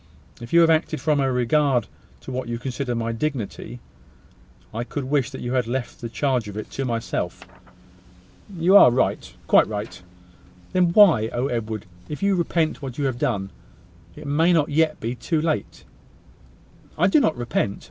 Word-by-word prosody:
If 120 - -9
you 170 - +6
have 165 - +5
acted 155 -1 +1
from 150 -2 +1
a 135 -1 +1
regard 125 -1 +2 0.4
to - - -8
what 130 -1 -4
you 120 0 -3
consider 125 0 -3
my 115 0 -2
dignity, 120 -2 -4 0.9
I 115 +2 -3
could 140 +3 -5
wish 135 -1 0
that 135 - -8
you 120 +1 -3
had 125 -3 +1
left 125 +1 -4
the 115 - -5
charge 125 -2 -1
of 105 0 -7
it 110 - -7
to 135 - -3
myself." 115 -2 -3 1.1
"You 175 +4 +4
are 200 - +9
right: 125 +2 0
quite - - +5
right." 105 -3 -6 0.7
"Then 185 -1 +4
why. 170 - +6
Oh! 120 +2 -1
Edward, 110 -3 -3 0.2
if 150 +6 -6
you 200 0 +3
repent 170 -3 0
what 130 -3 -7
you 145 - -1
have 130 -3 -2
done, 100 -5 -1 0.6
it - - -11
may 155 +5 +2
not 160 -4 +2
yet 155 +1 +1
be 115 +2 -3
too 160 +6 -2
late!" 155 0 -2 1.1
"I - - +3
do 310 - +5
not 160 - +1
repent. 115 -4 -2
130 Hz, 180 wpm, -23 LUFS, 120-155 Hz, 1.1 s, are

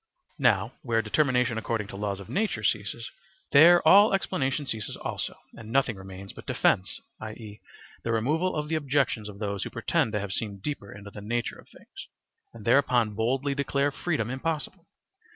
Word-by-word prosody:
Now - - +3
where 115 -6 +1
determination 125 -1 +2
according 110 -1 -2
to - - -8
laws 100 -1 -3
of 100 - -10
nature 195 - -1
ceases, 105 +3 -1 0.4
there 165 +4 +7
all 200 +4 +8
explanation 145 -7 -1
ceases 110 -5 -3
also, - - -4 0.2
and 115 -1 -10
nothing 130 -3 +2
remains 95 0 -9
but - - -12
defence, 95 +2 +1 0.2
i.e., 110 -1 -9 0.4
the 115 - -1
removal 155 +11 +1
of 150 -1 -2
the 160 - -3
objections 135 -7 0
of 100 - -10
those 100 -2 -3
who - - -5
pretend 120 +1 0
to 105 - +1
have 100 -1 -4
seen 105 -2 -3
deeper 100 -2 -5
into 100 0 -10
the 105 - -9
nature 120 +3 -2
of - - -17
things, - - -13 0.4
and 115 -3 -12
thereupon 120 -3 +3
boldly 130 +6 0
declare 140 0 0
freedom 140 -7 -2
impossible. 160 +5 -3
120 Hz, 170 wpm, -27 LUFS, 105-145 Hz, 0.4 s, all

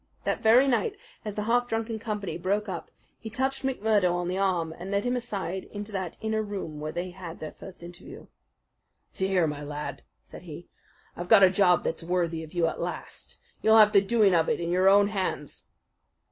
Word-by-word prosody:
That - - -1
very 240 +4 +6
night, 395 - 0 0.3
as 210 -2 -5
the 210 - -2
half 245 +2 +2
drunken 225 -1 -2
company 210 -6 -4
broke 200 +5 -1
up, 180 -4 -5 0.3
he 220 - -7
touched 265 +4 -1
McMurdo 215 -8 +1
on 175 0 -2
the 185 - -2
arm 175 -5 0
and 180 +3 -8
led 200 +2 0
him 245 +1 +1
aside 195 -7 -4
into 205 +1 -8
that 190 -4 -4
inner 220 0 0
room 195 -8 -5
where 155 +1 -4
they 175 +2 -4
had 175 -2 -9
their 155 - -6
first 185 -2 -12
interview. 175 0 -11 0.9
"See 190 - -1
here, 185 -3 +2
my 150 -2 -4
lad," 150 0 -6 0.2
said - - -11
he, - - -10 0.5
"I've 175 +1 -6
got 200 - +8
a 185 - +7
job 185 -3 +3
that's 165 - -2
worthy 170 -1 -1
of 155 - -11
you 175 -2 +1
at 165 - -2
last. - - -6 0.2
You'll 220 0 +5
have 210 -1 +7
the 200 - +7
doing 205 -1 +3
of 165 -2 +3
it - - 0
in 170 0 -2
your 185 +2 +4
own 200 +1 +5
hands." 190 -8 -4
195 Hz, 205 wpm, -27 LUFS, 175-220 Hz, 0.9 s, got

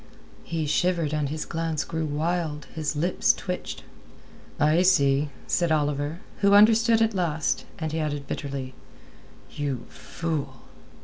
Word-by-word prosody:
He 165 -2 -2
shivered 165 0 +1
and 150 -2 0
his 155 +1 -3
glance 165 -2 -2
grew 160 -1 -3
wild; 155 0 -2
his 155 -1 -2
lips 175 +5 +2
twitched. 180 -1 -5 0.8
"I 155 +4 +4
see," 145 -5 +3 0.2
said 170 -2 +1
Oliver, 150 +1 0 0.2
who 200 0 +4
understood 225 +2 +6
at 225 0 +1
last, 160 -5 0
and 160 -2 -3
he 160 - -2
added 145 -2 -2
bitterly: 135 -2 -5 0.8
"You 140 -4 -3
fool!" 145 -6 -4
155 Hz, 130 wpm, -26 LUFS, 145-175 Hz, 0.8 s, understood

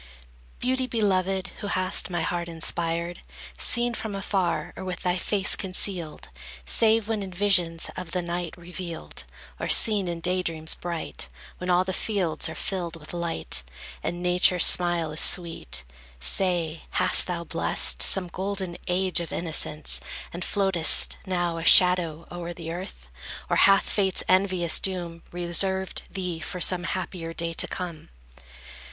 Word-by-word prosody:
Beauty 260 +1 -1
beloved, 195 -5 0
who 205 - -5
hast 185 0 -1
my 175 -2 -2
heart 175 0 -2
inspired, 170 +1 -1 0.4
Seen 240 0 +1
from 220 -3 -4
afar, 185 -5 -1
or - - -7
with 185 -1 -5
thy 180 -1 0
face 190 +1 +1
concealed, 185 -4 -2 0.4
Save, 220 - +3
when 220 -2 -1
in 190 -1 -6
visions 180 -3 +1
of 180 -2 -6
the 180 +1 -2
night 170 -1 -4
revealed, 175 -1 -8 0.3
Or - - -3
seen 210 -4 +6
in 170 -1 -3
daydreams 165 -3 0
bright, 170 - -5 0.3
When 180 - -4
all 180 0 +4
the 190 0 -4
fields 190 -6 0
are - - -7
filled 175 -3 -3
with 155 0 -10
light, 170 - -1 0.4
And 175 +1 -4
Nature's 180 0 +4
smile 175 -3 +2
is 155 - +1
sweet, 165 - +1 0.4
Say, 170 - 0
hast - - +3
thou 175 -2 -3
blessed - - +1
Some 190 -2 +4
golden 190 0 -4
age 180 0 +1
of 170 -2 -5
innocence, 155 -2 -1 0.3
And 175 +1 -5
floatest, 190 -5 +3
now, 175 -2 -1
a - - -5
shadow, 170 -3 +6
o'er 175 0 -6
the 165 -1 -7
earth? 185 +3 -8 0.4
Or - - +3
hath 195 0 +5
Fate's 190 -3 +1
envious 185 -3 +3
doom 175 -3 -2
Reserved 190 +2 0
thee 180 -4 -4
for 180 +2 -6
some 175 0 +3
happier 175 -2 -4
day 165 0 -3
to - - +2
come? 170 -4 -7
180 Hz, 145 wpm, -26 LUFS, 170-190 Hz, 0.4 s, seen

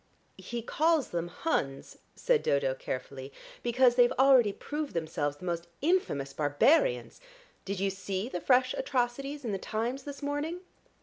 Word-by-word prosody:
"He 235 -1 -5
calls 315 +2 +2
them 170 0 -2
Huns," 160 - -3 0.2
said - - +2
Dodo 140 -2 +1
carefully, 130 +1 -6 0.3
"because 245 +1 +4
they've 245 0 +5
already 260 -5 +5
proved 295 - -5
themselves 155 -3 -2
the 180 - -10
most 170 -1 -3
infamous 265 - 0
barbarians. 280 - +2 0.4
Did 195 -1 -3
you 195 0 +1
see 195 +2 -4
the 180 -9 -5
fresh 255 0 +3
atrocities 275 - -2
in 225 - -1
the 195 - -2
Times 230 +7 -3
this 280 0 -9
morning?" 295 +5 -2
240 Hz, 145 wpm, -30 LUFS, 170-285 Hz, 0.4 s, they've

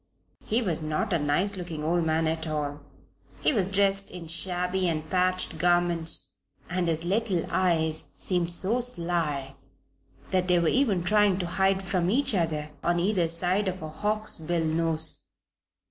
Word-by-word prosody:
He 230 +3 0
was 170 -6 -1
not 155 +5 -1
a 170 - +2
nice 160 +8 +1
looking 170 -4 -6
old 170 +2 +1
man 160 +1 +1
at 160 0 -2
all, 145 -1 -3 0.6
he - - +3
was 200 -7 +1
dressed 195 0 +2
in 180 -2 -8
shabby 180 +2 0
and 155 -1 -3
patched 185 -1 0
garments, 175 -1 +1 0.4
and 180 -1 0
his 165 0 0
little 195 -2 0
eyes 160 -4 +1
seemed 175 -2 +1
so 200 +8 +3
sly 170 - 0 0.8
that 185 -1 +1
they 180 -1 +4
were 170 -2 +2
even 220 -10 +2
trying 205 0 +3
to 185 - -2
hide 190 +2 +1
from 185 -2 0
each 265 +4 +1
other 155 -5 -1
on 175 0 +1
either 180 -2 +1
side 180 +4 0
of 185 -2 -3
a 155 - -5
hawksbill 175 -3 -1
nose. 160 0 -1
175 Hz, 160 wpm, -27 LUFS, 160-190 Hz, 0.8 s, they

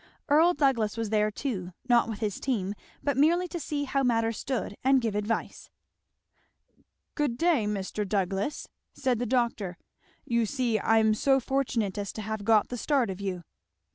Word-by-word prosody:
Earl 325 +5 +5
Douglass 230 -7 +1
was 225 -2 -2
there 210 -1 +3
too, 200 -6 -4
not 240 -2 +4
with 220 -1 -5
his 210 -3 -2
team, 205 -7 -1 0.3
but 285 -2 +1
merely 340 +5 +3
to 345 - -4
see 295 -1 -2
how 275 0 0
matters 230 -3 +1
stood 255 -6 -3
and 265 +1 +5
give 225 -4 -1
advice. 210 +2 -3 1.4
"Good 285 -6 -1
day, 320 -10 +2
Mr. 205 0 -3
Douglass!" 195 +6 -1 0.3
said 255 -4 0
the 245 - -1
doctor. 230 -7 0 0.5
"You 235 -2 +1
see 240 -3 0
I'm 220 +1 +3
so 270 +5 +3
fortunate 235 -7 -1
as 200 -1 -3
to 215 - -6
have 220 0 -4
got 215 -1 +3
the 245 - -4
start 260 -4 +1
of 190 +1 -7
you." 185 -3 -3
230 Hz, 170 wpm, -28 LUFS, 210-270 Hz, 1.4 s, Earl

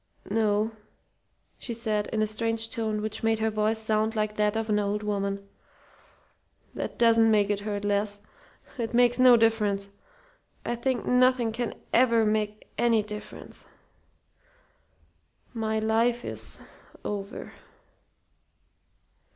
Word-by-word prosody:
"No," 215 0 +1 0.9
she 235 - -5
said 215 -2 -1
in 215 -1 0
a - - +3
strange 225 +1 0
tone 220 -2 -2
which 215 0 -2
made 225 0 +2
her 220 0 0
voice 215 +1 0
sound 220 0 0
like 215 0 -1
that 210 +1 +1
of 225 0 -2
an 210 -1 +2
old 205 +1 -1
woman. 200 -1 -2 1.3
"That - - -5
doesn't 230 -1 +5
make 210 -2 +3
it 205 - 0
hurt 205 0 -4
less. 205 0 0 0.6
It 230 0 -2
makes 245 0 +4
no 250 -1 +8
difference. 210 -3 +1 0.8
I - - -1
think 245 +1 -1
nothing 250 -2 +3
can 235 +1 -3 0.2
ever 235 -2 +4
make 210 0 -1
any 230 -2 +3
difference. 210 0 -9 1.9
My 220 -2 -1
life 230 +2 +1
is - - -3 0.5
over." 200 0 -5
220 Hz, 125 wpm, -27 LUFS, 210-230 Hz, 1.9 s, no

